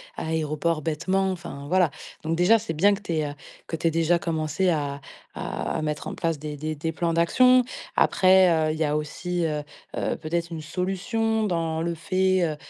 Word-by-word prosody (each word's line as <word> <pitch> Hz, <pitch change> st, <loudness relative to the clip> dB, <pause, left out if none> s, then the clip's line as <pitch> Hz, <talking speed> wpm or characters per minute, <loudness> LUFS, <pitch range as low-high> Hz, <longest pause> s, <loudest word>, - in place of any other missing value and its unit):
à -, -, -5 dB
l'aéroport 160 Hz, 0 st, -1 dB
bêtement, 185 Hz, +5 st, 0 dB
enfin 170 Hz, -6 st, -7 dB
voilà. 180 Hz, -1 st, +3 dB, 0.3 s
Donc 165 Hz, +1 st, -1 dB
déjà, 180 Hz, +6 st, +5 dB
c'est 220 Hz, -5 st, -4 dB
bien 195 Hz, +6 st, +4 dB
que 200 Hz, -, -4 dB
tu 205 Hz, -, -6 dB
aies, 155 Hz, -1 st, 0 dB
heu, -, -, -8 dB, 0.3 s
que -, -, -3 dB
tu 165 Hz, +1 st, 0 dB
aies -, -, +3 dB
déjà 165 Hz, +1 st, +2 dB
commencé 165 Hz, +2 st, 0 dB
à 145 Hz, -4 st, -1 dB, 0.3 s
à -, -, -3 dB
mettre 150 Hz, -1 st, -3 dB
en -, -, -5 dB
place 165 Hz, -3 st, -1 dB
des 150 Hz, 0 st, -5 dB
des 155 Hz, +2 st, -4 dB
des 160 Hz, +2 st, -3 dB
plans 170 Hz, +1 st, 0 dB
d'action. 250 Hz, +10 st, +5 dB, 0.3 s
Après, 185 Hz, 0 st, +5 dB, 0.2 s
heu, -, -, +1 dB
il -, -, -5 dB
y 160 Hz, -, +2 dB
a 150 Hz, 0 st, 0 dB
aussi, 175 Hz, +4 st, -2 dB
heu 150 Hz, -2 st, -2 dB, 0.3 s
heu, -, -, -1 dB
peut-être 170 Hz, +1 st, -3 dB
une 160 Hz, -1 st, -5 dB
solution 195 Hz, +7 st, -1 dB
dans 165 Hz, -5 st, -1 dB
le 170 Hz, 0 st, -1 dB
fait, 185 Hz, +2 st, +1 dB
heu 155 Hz, -2 st, -2 dB
165 Hz, 205 wpm, -25 LUFS, 155-185 Hz, 0.3 s, déjà